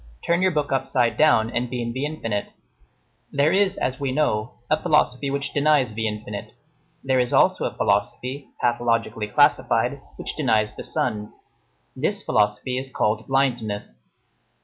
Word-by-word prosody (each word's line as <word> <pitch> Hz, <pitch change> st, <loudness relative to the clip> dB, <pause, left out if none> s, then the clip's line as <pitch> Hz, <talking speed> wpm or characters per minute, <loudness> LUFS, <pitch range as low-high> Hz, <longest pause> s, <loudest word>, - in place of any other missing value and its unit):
Turn 170 Hz, +1 st, +2 dB
your 185 Hz, -, +4 dB
book 150 Hz, -5 st, -1 dB
upside 135 Hz, -3 st, +1 dB
down 115 Hz, -7 st, +4 dB
and 120 Hz, 0 st, -1 dB
be 125 Hz, 0 st, -4 dB
in 120 Hz, 0 st, -3 dB
the 135 Hz, +3 st, -2 dB
infinite. 115 Hz, -9 st, -4 dB, 0.8 s
There 145 Hz, +4 st, +2 dB
is, 195 Hz, 0 st, +2 dB
as 130 Hz, +3 st, -2 dB
we 140 Hz, -2 st, -1 dB
know, 130 Hz, -6 st, 0 dB
a -, -, +1 dB
philosophy 130 Hz, +3 st, +2 dB
which 140 Hz, +1 st, -3 dB
denies 145 Hz, -5 st, +3 dB
the 110 Hz, +1 st, -1 dB
infinite. 105 Hz, -1 st, -6 dB, 0.5 s
There 130 Hz, -1 st, +2 dB
is 125 Hz, -1 st, 0 dB
also -, -, +3 dB
a -, -, -3 dB
philosophy, 125 Hz, +7 st, -1 dB
pathologically 115 Hz, -2 st, 0 dB
classified, 105 Hz, -, +2 dB
which -, -, -6 dB
denies 110 Hz, -7 st, +1 dB
the -, -, -7 dB
sun; 105 Hz, -3 st, -2 dB, 0.6 s
this -, -, -1 dB
philosophy 105 Hz, +5 st, +1 dB
is 135 Hz, 0 st, -5 dB
called 110 Hz, -3 st, -1 dB
blindness. 115 Hz, -, -1 dB
125 Hz, 150 wpm, -23 LUFS, 110-140 Hz, 0.8 s, your